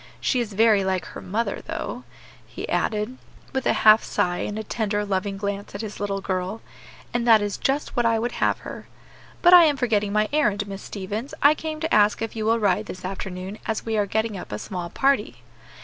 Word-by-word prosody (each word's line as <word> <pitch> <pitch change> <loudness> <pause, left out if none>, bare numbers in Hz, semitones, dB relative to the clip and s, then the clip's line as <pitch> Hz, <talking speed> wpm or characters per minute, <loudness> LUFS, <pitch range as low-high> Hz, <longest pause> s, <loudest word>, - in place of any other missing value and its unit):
She 255 - +1
is 225 -4 -3
very 215 -1 +4
like 190 -1 -1
her - - -9
mother, 220 +5 -2
though," - - -5 0.4
he - - -7
added, 215 +4 -1 0.3
with 265 -1 -1
a - - +4
half 215 +1 +8
sigh 175 0 0
and 205 - -3
a 220 - -3
tender, 210 -1 -1
loving 195 0 -2
glance 200 0 -4
at 200 - -4
his 215 -2 -7
little 200 -1 -2
girl, 185 +3 -2 0.5
"and 240 0 0
that 225 -2 +8
is 205 -1 -2
just 275 +2 -1
what 240 - +2
I 230 -1 +3
would 235 +2 -1
have - - +1
her. - - -9 0.6
But 350 0 +7
I 350 -2 +10
am 295 -3 +2
forgetting 215 -5 +1
my 215 +1 +2
errand, 210 -9 +1
Miss 195 0 -7
Stevens; 210 +6 -5
I 290 +2 +8
came 310 0 -5
to 320 - -1
ask 210 0 +4
if 225 - -5
you 220 -1 -2
will 230 +1 +4
ride 200 -5 +1
this 185 0 -8
afternoon, 190 +1 -5
as 220 -1 -2
we 225 -1 -1
are 205 -1 +1
getting 220 +1 -1
up 185 - -8
a 105 - -3
small 175 - -5
party." 210 - 0
210 Hz, 215 wpm, -24 LUFS, 195-230 Hz, 0.6 s, I